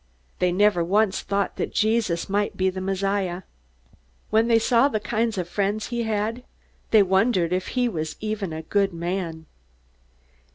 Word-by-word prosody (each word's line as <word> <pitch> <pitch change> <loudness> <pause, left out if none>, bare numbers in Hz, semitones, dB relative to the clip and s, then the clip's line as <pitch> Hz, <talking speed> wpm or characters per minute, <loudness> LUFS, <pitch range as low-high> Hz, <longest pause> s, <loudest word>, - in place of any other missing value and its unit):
They 180 -1 +2
never 200 -1 +3
once 200 +3 +1
thought 200 0 -2
that - - -3
Jesus 215 -6 +1
might 205 +1 -1
be 190 0 +2
the 185 0 -5
Messiah. 195 -1 -1 0.9
When 220 +2 +3
they 230 -1 +5
saw 235 +3 +4
the 220 -7 -1
kind 225 0 -1
of 180 -2 -2
friends 205 +3 -1
he 240 -1 -2
had, 220 +2 -1 0.5
they 215 -2 +6
wondered 190 -2 +2
if 185 0 -1
he 250 -1 +3
was 160 -8 -3
even 215 -4 -3
a 160 0 -5
good 195 +2 +1
man. 170 -2 -4
200 Hz, 160 wpm, -24 LUFS, 180-220 Hz, 0.9 s, they